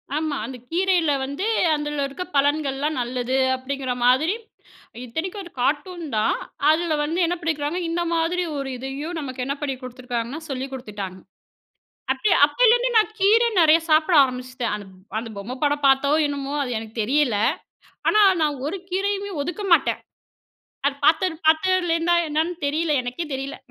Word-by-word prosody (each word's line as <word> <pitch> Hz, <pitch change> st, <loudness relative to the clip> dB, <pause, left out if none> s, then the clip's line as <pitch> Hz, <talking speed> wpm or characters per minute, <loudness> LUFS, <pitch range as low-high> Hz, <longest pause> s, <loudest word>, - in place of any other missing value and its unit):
ஆமா, 310 Hz, -1 st, -1 dB
அந்த 260 Hz, -, -7 dB
கீரையில 355 Hz, -3 st, +2 dB
வந்து 280 Hz, +8 st, -4 dB, 0.3 s
அந்தில 295 Hz, -1 st, -2 dB
இருக்க 275 Hz, +6 st, -6 dB
பலன்கள்லாம் 285 Hz, +1 st, +1 dB
நல்லது 250 Hz, +1 st, -2 dB, 0.2 s
அப்டிங்கிற 260 Hz, 0 st, -3 dB
மாதிரி, 265 Hz, +9 st, +4 dB, 0.7 s
இத்தனைக்கும் 340 Hz, -, -4 dB
ஒரு 345 Hz, -, -12 dB
கார்ட்டூன் 330 Hz, +6 st, -1 dB
தான். 215 Hz, -, +2 dB, 0.3 s
அதில 320 Hz, +1 st, +2 dB
வந்து 320 Hz, +4 st, -2 dB
என்ன 345 Hz, +1 st, 0 dB
பண்ணிக்கிறாங்க, 315 Hz, +1 st, -1 dB
இந்த 340 Hz, +1 st, -1 dB
மாதிரி 335 Hz, +2 st, +1 dB
ஒரு 275 Hz, -1 st, -3 dB
இதையும் 275 Hz, +6 st, -5 dB
நமக்கு 260 Hz, -3 st, -5 dB
என்ன 280 Hz, +2 st, -2 dB
பண்ணி 275 Hz, -2 st, -2 dB
குடுத்துருக்காங்கன்னா, 250 Hz, +2 st, -5 dB
சொல்லி 265 Hz, 0 st, -3 dB
குடுத்துட்டாங்க. 205 Hz, -7 st, -6 dB, 0.9 s
அப்ப 420 Hz, -, 0 dB
அப்பெளிருந்த்தே 485 Hz, +9 st, +3 dB
நா -, -, +9 dB, 0.2 s
கீர 420 Hz, +4 st, +5 dB, 0.2 s
நெறைய 320 Hz, 0 st, +6 dB
சாப்பிட 310 Hz, +3 st, +4 dB
ஆரம்பிச்சிட்டேன். 255 Hz, -1 st, -4 dB
அந் 205 Hz, -, -9 dB, 0.3 s
அந்த 225 Hz, 0 st, -6 dB
பொம்ம 230 Hz, +6 st, -6 dB
படம் 290 Hz, 0 st, +1 dB
பார்த்தோ? 270 Hz, +1 st, +4 dB, 0.2 s
என்னமோ? 280 Hz, -1 st, -4 dB
அது 260 Hz, -, -3 dB
எனக்கு 220 Hz, 0 st, -9 dB
தெரியல, 250 Hz, -1 st, +2 dB, 0.7 s
ஆனா 425 Hz, -, +5 dB, 0.2 s
நா 305 Hz, -, +4 dB, 0.2 s
ஒரு 385 Hz, +6 st, -3 dB
கீரையுமே 400 Hz, +2 st, -1 dB
ஒதுக்க 355 Hz, +7 st, -5 dB
மாட்டேன். 340 Hz, -, +3 dB, 0.9 s
அது 285 Hz, -, +1 dB
பார்த்த 325 Hz, +4 st, +4 dB, 0.2 s
பார்த்ததிலேருந்தா 345 Hz, 0 st, +3 dB
என்னன்னு 315 Hz, +4 st, 0 dB
தெரியல 310 Hz, +2 st, 0 dB
எனக்கே 250 Hz, +7 st, -4 dB
தெரியல. 270 Hz, +1 st, -5 dB
295 Hz, 145 wpm, -23 LUFS, 260-340 Hz, 0.9 s, நா